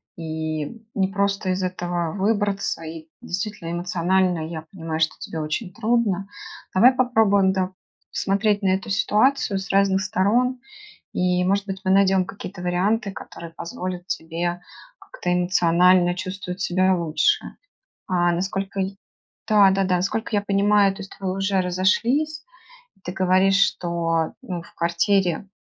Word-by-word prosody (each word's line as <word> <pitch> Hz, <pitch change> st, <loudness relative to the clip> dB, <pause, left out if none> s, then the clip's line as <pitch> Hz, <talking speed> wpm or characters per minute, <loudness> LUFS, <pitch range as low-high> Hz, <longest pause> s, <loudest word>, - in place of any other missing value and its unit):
и 160 Hz, -2 st, -3 dB, 0.3 s
не 190 Hz, -2 st, +2 dB
просто 200 Hz, 0 st, -1 dB
из 185 Hz, +1 st, -1 dB
этого 175 Hz, -2 st, -2 dB
выбраться, 200 Hz, -3 st, 0 dB
и 160 Hz, 0 st, -8 dB
действительно, 195 Hz, -2 st, -4 dB
эмоционально 180 Hz, 0 st, +1 dB
я 160 Hz, -1 st, -6 dB
понимаю, 165 Hz, -4 st, -4 dB
что 160 Hz, -1 st, +1 dB
тебе 160 Hz, -, -6 dB
очень 160 Hz, +6 st, -3 dB
трудно. 220 Hz, -4 st, 0 dB, 0.5 s
Давай 235 Hz, +7 st, +7 dB
попробуем, 215 Hz, -6 st, +3 dB
да, 190 Hz, 0 st, -1 dB, 0.4 s
смотреть 205 Hz, +1 st, +1 dB
на 195 Hz, -, +1 dB
эту 190 Hz, +2 st, -1 dB
ситуацию 210 Hz, +2 st, +2 dB
с 190 Hz, -, -7 dB
разных 195 Hz, -1 st, +3 dB
сторон, 230 Hz, +6 st, +1 dB, 0.5 s
и 180 Hz, 0 st, +1 dB
может 200 Hz, +2 st, +1 dB
быть 195 Hz, -1 st, -5 dB
мы 190 Hz, -, +1 dB
найдем 195 Hz, -1 st, +4 dB
какие-то 195 Hz, -2 st, -8 dB
варианты, 200 Hz, +5 st, 0 dB
которые 170 Hz, -3 st, -9 dB
позволят 180 Hz, +2 st, -6 dB
тебе 175 Hz, +1 st, -3 dB, 0.4 s
как-то 180 Hz, 0 st, -3 dB
эмоционально 180 Hz, 0 st, +4 dB
чувствовать 185 Hz, 0 st, -6 dB
себя 185 Hz, 0 st, +2 dB
лучше. 170 Hz, -, 0 dB, 0.5 s
А 175 Hz, -1 st, +2 dB
насколько 195 Hz, +2 st, -2 dB
я 190 Hz, 0 st, 0 dB, 0.6 s
да, 205 Hz, -3 st, +6 dB
да, 195 Hz, 0 st, +1 dB
да. 180 Hz, -1 st, +1 dB
Сколько 220 Hz, +3 st, -2 dB
я 205 Hz, -, +3 dB
понимаю, 200 Hz, 0 st, +3 dB
то 195 Hz, -, -11 dB
есть 195 Hz, -, -11 dB
вы 190 Hz, -, -2 dB
уже 195 Hz, 0 st, +1 dB
разошлись, 235 Hz, -, +1 dB, 0.6 s
ты 180 Hz, -, -4 dB
говоришь, 190 Hz, +1 st, +3 dB
что, 170 Hz, -4 st, 0 dB
ну, 180 Hz, -8 st, -5 dB
в -, -, -18 dB
квартире, 175 Hz, +2 st, +1 dB
190 Hz, 140 wpm, -23 LUFS, 175-200 Hz, 0.6 s, Давай